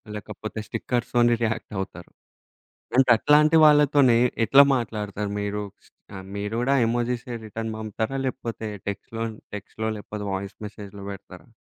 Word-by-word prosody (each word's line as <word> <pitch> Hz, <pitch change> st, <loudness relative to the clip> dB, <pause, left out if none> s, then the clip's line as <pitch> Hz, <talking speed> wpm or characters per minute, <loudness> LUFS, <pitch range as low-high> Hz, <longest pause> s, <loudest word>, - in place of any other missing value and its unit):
లేకపోతే 110 Hz, +1 st, -7 dB
స్టిక్కర్స్ 120 Hz, -1 st, -2 dB
తోని 120 Hz, 0 st, +5 dB
రియాక్టవుతరు. 95 Hz, -5 st, -4 dB, 0.9 s
అంటే 130 Hz, -1 st, +5 dB
అట్లాంటి 150 Hz, +6 st, +5 dB
వాళ్ళతోనే 145 Hz, -4 st, +5 dB, 0.3 s
ఎట్లా 140 Hz, +4 st, +8 dB
మాట్లాడుతారు 105 Hz, -3 st, -3 dB
మీరు? 105 Hz, 0 st, -2 dB, 0.2 s
శ్ -, -, -22 dB, 0.3 s
ఆహ్, 95 Hz, -1 st, -8 dB
మీరు 105 Hz, +2 st, -3 dB
కూడా 135 Hz, +3 st, +2 dB
ఎమోజిస్ 120 Hz, +1 st, -1 dB, 0.2 s
రిటర్న్ 110 Hz, +1 st, -5 dB
పంపుతారా? 110 Hz, +4 st, -3 dB
లేకపోతే 115 Hz, -4 st, -4 dB, 0.2 s
టెక్స్ట్‌లో, 115 Hz, +3 st, -4 dB, 0.3 s
టెక్స్ట్‌లో 110 Hz, +2 st, -5 dB
లేకపోతే 105 Hz, 0 st, -7 dB
వాయిస్ 95 Hz, +1 st, -5 dB
మెసేజ్‌లో 100 Hz, -1 st, -10 dB
బెడతారా? 90 Hz, -2 st, -11 dB
110 Hz, 125 wpm, -25 LUFS, 105-125 Hz, 0.9 s, ఎట్లా